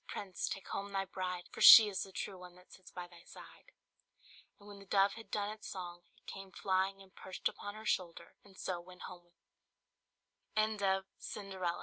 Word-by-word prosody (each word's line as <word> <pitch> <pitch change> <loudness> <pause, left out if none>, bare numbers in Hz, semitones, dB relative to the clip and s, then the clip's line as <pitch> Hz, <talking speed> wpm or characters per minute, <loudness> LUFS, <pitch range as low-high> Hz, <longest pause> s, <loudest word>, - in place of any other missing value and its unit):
prince! 190 -4 -4
take 195 - -6
home 200 0 -4
thy 195 -1 -1
bride. 185 -2 -4
For - - -8
she 225 - +13
is 195 -2 -3
the 195 - -10
true 190 0 -5
one 180 -1 -12
that 180 0 -20
sits 185 - -14
by 180 - -6
thy 175 -1 -16
side!" - - -14 0.9
And 205 - -16
when 205 -1 -10
the 195 - -13
dove 195 0 +3
had 225 -1 -11
done 205 0 -1
its 215 0 -9
song, 175 -2 -6 0.2
it - - -28
came 195 0 -9
flying 190 +1 0
and 190 0 -21
perched 190 - -3
upon 205 0 -6
her 220 0 -10
shoulder, 175 -5 -2
and 195 -2 -18
so 180 -2 -3
went 180 +1 -13
ho 175 -1 -11
190 Hz, 185 wpm, -35 LUFS, 180-200 Hz, 0.9 s, she